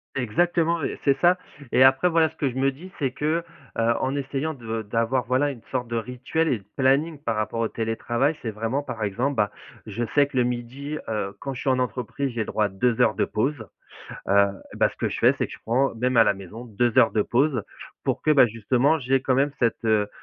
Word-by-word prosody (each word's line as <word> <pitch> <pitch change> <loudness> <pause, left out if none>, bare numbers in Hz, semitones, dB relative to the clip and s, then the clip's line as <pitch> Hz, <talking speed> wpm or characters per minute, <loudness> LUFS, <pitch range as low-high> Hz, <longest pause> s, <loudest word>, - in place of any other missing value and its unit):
Exactement, 165 +6 +1
et - - -3
c'est 140 -1 +4
ça. 175 +1 +5 0.3
Et 130 - +5
après, 135 +7 +5
voilà, 165 -2 +3
ce 160 - -22
que 145 -3 0
je 125 - -8
me 135 +1 +2
dis, 170 +8 -12
c'est 135 -4 -1
que: 155 +5 -1 0.3
«heu, 115 +1 +3
en 130 +1 -1
essayant 140 +3 -2
de 115 -3 -4
d'avoir, 115 +4 0
voilà, 130 +4 +2
une 125 -4 -11
sorte 125 -2 -2
de 115 - -4
rituel 125 +7 -2
et 130 - +1
de 95 - -22
planning 140 +4 +2
par 115 -4 -1
rapport 110 +2 -2
au 115 - +1
télétravail, 120 +6 -1
c'est 115 - -3
vraiment, 115 +6 -2
par 115 -6 -5
exemple, 120 +8 -1
bah, 105 -2 +1 0.3
je 110 +2 -3
sais 145 - +6
que 140 - -13
le 125 - +4
12:00, 125 +5 -4
heu, 100 -3 -3
quand 135 - -4
je 125 - -7
suis - - 0
en 130 - +3
entreprise, 125 +2 -2
j'ai 115 - -4
le 110 - 0
droit 105 - +1
à - - -1
2 115 +5 0
heures 115 - +4
de - - 0
pause, 135 +8 -1 0.7
heu. 100 0 +6 0.3
Bah, - - +3
ce - - -17
que - - -1
je - - -4
fais, - - +5
c'est - - 0
que - - -13
je - - -9
prends 125 +4 +1
même 125 +2 0
à 115 - +7
la 105 - +2
maison 100 +5 -10
2 120 0 0
heures - - +5
de 105 - +2
pause 130 0 +1 0.4
pour - - -1
que, 155 - +3
bah, 135 -4 +6
justement, 125 +7 +1
j'aie 135 -1 +1
quand 130 0 +1
même 140 +1 +2
cette, 115 -1 0
heu 110 -2 +2
125 Hz, 245 wpm, -24 LUFS, 115-140 Hz, 0.7 s, à